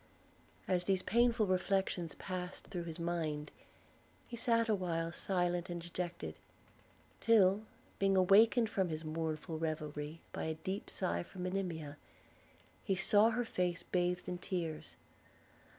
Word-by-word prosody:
As 180 -1 +2
these 190 -1 +1
painful 235 -1 +3
reflections 185 -3 0
passed 185 -1 -5
through 175 -2 -5
his 165 -1 -5
mind, 165 -3 -2 0.8
he 240 - -6
sat 230 0 +2
a 220 - +3
while 165 -4 -1
silent 175 -1 0
and 175 0 -3
dejected, 175 0 -4 0.9
till, 210 -2 +5 0.3
being 195 -1 +3
awakened 220 +5 +6
from 190 -4 0
his 155 0 -4
mournful 160 +1 -3
reverie 155 -1 -3
by - - -3
a 160 0 -1
deep 190 +6 -4
sigh 85 0 -1
from 180 - -8
Monimia, 175 -6 -3 0.9
he 195 - +1
saw 205 +4 +5
her 240 +1 0
face 180 -5 -1
bathed 180 0 0
in 180 0 -3
tears. 170 -5 -3
180 Hz, 135 wpm, -35 LUFS, 165-195 Hz, 0.9 s, awakened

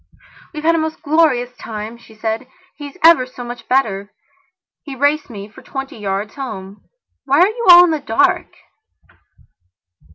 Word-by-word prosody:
"We've 305 -2 -7
had 330 +1 +3
a 330 - +1
most 315 +1 -4
glorious 285 -6 +1
time," 215 +1 -7
she 225 -1 -18
said. 220 +3 -3 0.3
"He's 290 +2 -10
ever 325 -6 +6
so 255 -1 -10
much 240 0 -9
better. 205 -6 0 0.7
He 280 -3 -8
raced 285 +3 +1
me 205 -3 -8
for 215 - -16
twenty 270 -4 -7
yards 200 +1 -3
home. 200 -8 -8 0.4
Why 280 +2 +2
are 365 - +6
you 460 +1 -4
all 350 0 +11
in 350 - +2
the 315 - -1
dark?" 225 -6 +1
260 Hz, 160 wpm, -18 LUFS, 220-310 Hz, 0.7 s, all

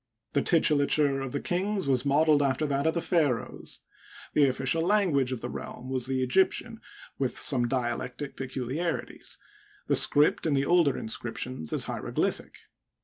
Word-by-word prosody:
The 140 - +2
titulature 145 -3 +2
of 135 - -5
the 145 - -2
kings 190 +2 -1
was 135 0 +1
modeled 150 +1 +4
after 140 +2 +1
that 140 +1 0
of 160 - +1
the 170 - 0
pharaohs. 150 -11 -1 0.5
The 145 -2 +5
official 135 +5 0
language 170 -9 +2
of 125 -3 -4
the - - -4
realm 130 +1 -7
was 130 -2 0
the 130 -1 0
Egyptian, 190 - +1 0.4
with 130 -2 -1
some 125 -4 +2
dialectic 125 +2 -3
peculiarities; 135 +6 -4 0.5
the - - +2
script 150 +2 +3
in 150 - +2
the 135 0 +1
older 165 -5 +3
inscriptions 115 -4 -4
is - - +1
hieroglyphic. - - -3
140 Hz, 150 wpm, -28 LUFS, 130-160 Hz, 0.5 s, The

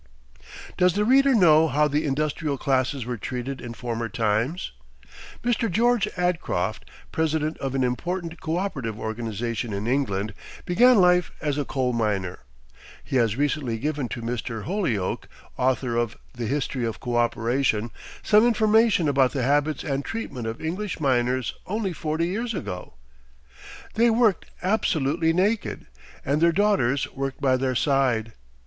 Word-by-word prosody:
Does 180 -1 +4
the 210 +1 +2
reader 270 +2 +5
know 160 -6 +6
how 150 +1 +2
the 150 +1 0
industrial 150 +1 -1
classes 130 -2 0
were 120 -1 -3
treated 125 +4 -5
in 115 -1 -7
former 115 -1 -3
times? 115 - -1 0.7
Mr. 235 -1 +1
George 230 +2 +2
Adcroft, 180 -2 -1 0.2
president 160 -1 0
of 135 -1 -3
an 130 - +1
important 170 +7 -3
coöperative 155 - -3
organization 115 0 -3
in 100 +1 -3
England, 110 -5 0 0.3
began 240 +6 +5
life 180 -1 +4
as 150 -2 -1
a 145 - -1
coal 130 -3 -1
miner. 100 -5 -1 0.6
He 135 - -1
has 115 -3 +2
recently 140 -5 0
given 145 0 -2
to 115 - -5
Mr. 115 -1 -4
Holyoake, 145 - -1 0.3
author 125 -1 0
of 120 -2 -1 0.2
the 120 -2 -4
"History 135 -1 -2
of 115 -2 -3
Coöperation," 120 -1 0 0.3
some 210 0 +5
information 220 -5 +3
about 135 -2 +3
the 135 -4 -1
habits 145 +2 +1
and 140 -2 -2
treatment 140 - -5
of 115 +1 -4
English 180 +5 -3
miners 130 -3 +1
only 200 -2 -2
forty 160 +1 -1
years 225 +6 -2
ago: 90 - -6 1.0
"They 235 +2 +4
worked 225 -5 +2 0.2
absolutely 165 -5 +1
naked, 200 +6 0 0.4
and 145 +3 +1
their 170 0 +5
daughters 170 - +2
worked 135 0 -4
by 135 -2 +3
their 130 0 -1
side. 125 -5 +1
140 Hz, 140 wpm, -25 LUFS, 120-180 Hz, 1.0 s, know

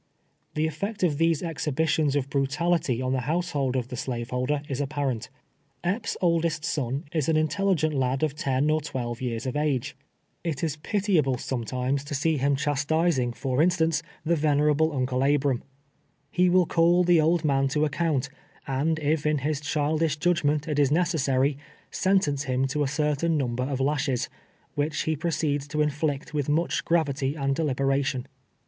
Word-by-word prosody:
The 155 +1 +1
effect 195 +7 -3
of 150 -5 +1
these 165 -1 +2
exhibitions 155 -2 0
of 140 -2 0
brutality 140 -2 0
on 130 0 0
the 130 - +1
household 150 -6 0
of 125 -1 -2
the 125 - -5
slave 120 -1 -4
holder, 130 +4 -1
is 135 0 -2
ai)parent. 140 -5 -2 0.5
Epps' 190 +7 -1
oldest 165 -3 +1
son 135 0 -2
is 155 -2 0
an 160 - +3
intelligent 155 0 +1
lad 135 0 0
of 155 -3 +1
ten 140 0 0
or 155 0 +1
twelve 120 -5 -4
years 120 -2 -3
of 130 - -3
age. 150 -4 -1 0.5
It 160 -4 -3
is 155 -2 -1
pitiable, 170 - +1
sometimes, 130 +2 -2
to 145 0 -4
see 160 +2 +1
him 140 +1 +2
clias 135 - -4
ErPs' 150 - -2
OLDEST 145 -1 0
SON. 160 - +2 0.3
261 - - -4
tising, - - -13
for 130 +4 0
instance, 165 -2 +2 0.2
tlie 170 +1 +2
venerable 150 +1 +3
Uncle 130 -2 -1
Abram. 140 -2 +2 0.7
lie 180 - +4
■will 180 -1 +4
call 170 +1 +4
the 175 -2 +5
old 165 +1 +2
man 135 -2 +2
to 150 +3 +1
account, 150 -2 0 0.4
and 145 +4 0
if 150 0 0
in 150 0 +2
his 145 +1 -2
child 150 +1 0
ish 155 -2 +1
judgment 150 -2 +1
it 150 -2 0
is 140 -2 +4
necessary, 145 -5 +1 0.3
sentence 185 -8 +1
him 130 0 +1
to 140 +3 -1
a 145 - +2
cer 150 +2 0
tain 165 +2 0
number 125 -2 -1
of 135 -1 -2
lashes, 135 -2 0 0.4
which 145 +1 -1
he 160 - 0
proceeds 150 -3 -1
to 150 +1 -3
inflict 150 +1 -2
with 145 -2 -1
much 160 +3 +1
gravity 145 -4 +1
and 140 -2 0
deliberation. 135 -3 0
145 Hz, 180 wpm, -26 LUFS, 135-160 Hz, 0.7 s, the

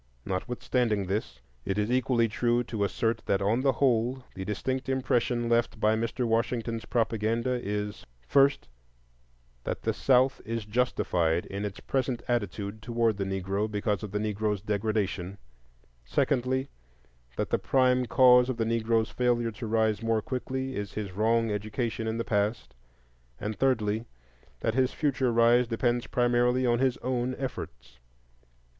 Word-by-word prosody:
Notwithstanding 110 +1 -1
this, 100 +4 -3 0.2
it 95 - -2
is 105 +2 0
equally 125 -2 +2
true 120 +2 +1
to 110 -3 -3
assert 115 +3 0
that 100 - +2
on 105 +5 +1
the 135 0 +3
whole 125 -1 +1
the 95 - -6
distinct 130 +7 -3
impression 120 -2 +1
left 115 -1 +1
by 110 0 +3
Mr. 115 +2 -1
Washington's 115 0 -1
propaganda 115 +2 0
is, 105 0 -3 0.2
first, 140 0 +3 1.0
that - - -4
the - - +1
South 130 0 +3
is 115 -1 -4
justified 90 -7 +1
in 100 +1 -4
its 100 -1 -5
present 130 -3 -2
attitude 105 -2 -2
toward 115 -1 +1
the 100 - -2
Negro 95 +2 -2
because 105 -1 -1
of 105 - -5
the 105 - -3
Negro's 105 0 -1
degradation; 100 -2 -2 0.7
secondly, 130 - 0 0.7
that - - -2
the - - +2
prime 125 -1 +2
cause 125 0 +6
of 130 - -2
the 115 - 0
Negro's 115 0 +1
failure 120 -2 +1
to 115 +1 -7
rise 110 -1 +1
more 115 -1 0
quickly 130 +1 -3
is 100 -1 -4
his 105 -3 -4
wrong 115 +3 +1
education 110 +2 -2
in 110 0 -1
the 115 - -2
past; 105 +1 -1 0.7
and, 105 +1 -3
thirdly, 110 -4 +1 0.6
that 110 - 0
his 130 +1 +2
future 135 -4 +1
rise 120 +1 +4
depends 120 +2 0
primarily 125 0 +2
on 120 -1 +2
his 130 -1 +2
own 125 0 -1
efforts. 65 - -7
115 Hz, 150 wpm, -28 LUFS, 105-125 Hz, 1.0 s, cause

